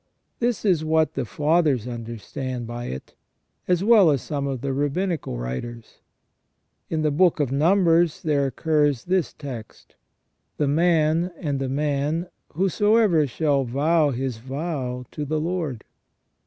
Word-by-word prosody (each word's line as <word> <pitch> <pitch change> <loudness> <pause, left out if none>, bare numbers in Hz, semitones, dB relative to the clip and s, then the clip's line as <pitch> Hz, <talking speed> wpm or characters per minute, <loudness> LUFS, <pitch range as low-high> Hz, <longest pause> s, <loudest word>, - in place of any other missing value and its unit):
This 240 -2 -1
is 175 -6 +3
what 160 0 +2
the 135 - -2
Fathers 150 -2 +1
understand 120 +2 -5
by 120 +1 -6
it, 65 +1 -7 0.5
as 180 0 +2
well 210 -5 +6
as 140 -5 +1
some 140 -2 -3
of 135 -3 -3
the 140 -1 -2
Rabbinical 145 - -1
writers. 110 - -6 0.9
In 160 -1 -1
the 150 - +2
Book 170 +2 +3
of 140 -4 0
Numbers 170 +2 +3
there 145 -3 +1
occurs 145 -2 +1
this 185 -2 +1
text: 125 -7 -9 0.3
" - - -50
The 145 - +1
man 165 +2 +2
and 145 -5 -2
the 135 -1 -2
man 150 +4 -1 0.2
whosoever 195 -2 +3
shall 140 +1 +1
vow 150 +5 +2
his 130 -2 -3
vow 130 -1 -4
to 150 - -4
the 155 +2 -1
Lord 160 -7 -3
150 Hz, 140 wpm, -24 LUFS, 130-170 Hz, 0.9 s, well